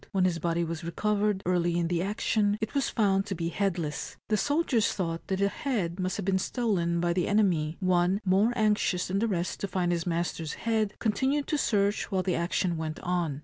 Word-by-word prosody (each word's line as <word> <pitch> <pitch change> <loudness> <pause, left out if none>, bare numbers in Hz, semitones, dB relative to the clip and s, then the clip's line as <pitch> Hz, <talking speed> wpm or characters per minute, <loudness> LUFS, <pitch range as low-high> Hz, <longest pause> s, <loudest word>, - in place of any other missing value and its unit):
When 190 -2 +3
his 175 -2 +1
body 170 +1 0
was 165 0 -4
recovered, 205 +3 0
early 175 -1 +1
in 170 -1 +1
the 170 0 0
action, 205 +1 +1
it 220 -1 -3
was 280 -1 +1
found 195 -3 +1
to 195 - -3
be 165 0 -2
headless. 170 -5 -2
The 215 - +3
soldiers 285 - +1
thought 165 -3 -3
that 190 - -1
the 200 +1 +2
head 200 -7 -2
must 185 0 -1
have 200 - -4
been 190 -1 +2
stolen 185 -7 0
by 175 0 +1
the 180 0 0
enemy. 175 -7 +2
One, 185 0 +2
more 195 +5 +3
anxious 210 -4 +1
than 195 +2 0
the 230 - +1
rest 180 -4 -2
to 200 - -2
find 180 -2 0
his 170 0 -1
master's 170 -2 -2
head, 220 -3 +1
continued 265 +6 0
to 305 - +1
search 200 -2 +1
while 190 -1 +1
the 185 - 0
action 170 0 0
went 155 -1 -4
on. 170 -6 -1
185 Hz, 210 wpm, -28 LUFS, 170-210 Hz, -, When